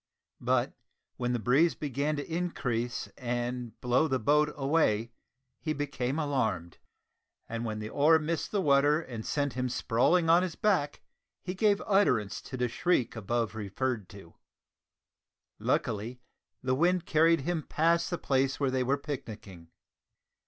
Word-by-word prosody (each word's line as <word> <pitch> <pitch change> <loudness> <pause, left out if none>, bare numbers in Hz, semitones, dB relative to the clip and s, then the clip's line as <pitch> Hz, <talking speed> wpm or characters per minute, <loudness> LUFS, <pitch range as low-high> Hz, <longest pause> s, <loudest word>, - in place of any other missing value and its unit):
But - - +1 0.4
when 125 -1 -1
the 125 - +1
breeze 135 - +3
began 145 +1 -2
to 145 - -4
increase 125 -9 -2
and 120 -2 -3
blow 125 +5 +2
the 135 -3 +1
boat 150 +5 +2
away 135 -6 +1 0.5
he 155 - -2
became 140 -2 -2
alarmed; 110 - -1 0.7
and 115 +1 -4
when 110 -1 -3
the 105 0 -5
oar 155 +6 +5
missed 160 +1 -2
the 205 - 0
water 145 +1 +4
and 120 -9 -7
sent 145 0 -1
him 125 +1 -2
sprawling 125 +8 +2
on 170 +2 +6
his 180 -3 -3
back, 180 -9 0 0.4
he 180 - -3
gave 200 +1 +2
utterance 125 - +2
to 130 - -7
the 125 0 +1
shriek 125 -2 0
above 115 0 -1
referred 110 +1 -3
to. 95 -5 -13 1.3
Luckily 115 +3 -1 0.4
the 130 0 +1
wind 175 +5 +2
carried 165 0 +4
him 170 +3 -1
past 165 +3 +1
the 175 - -2
place 135 -2 0
where 140 -2 +1
they 130 0 0
were 135 +3 +1
picnicking. 110 - -8
135 Hz, 145 wpm, -29 LUFS, 120-160 Hz, 1.3 s, on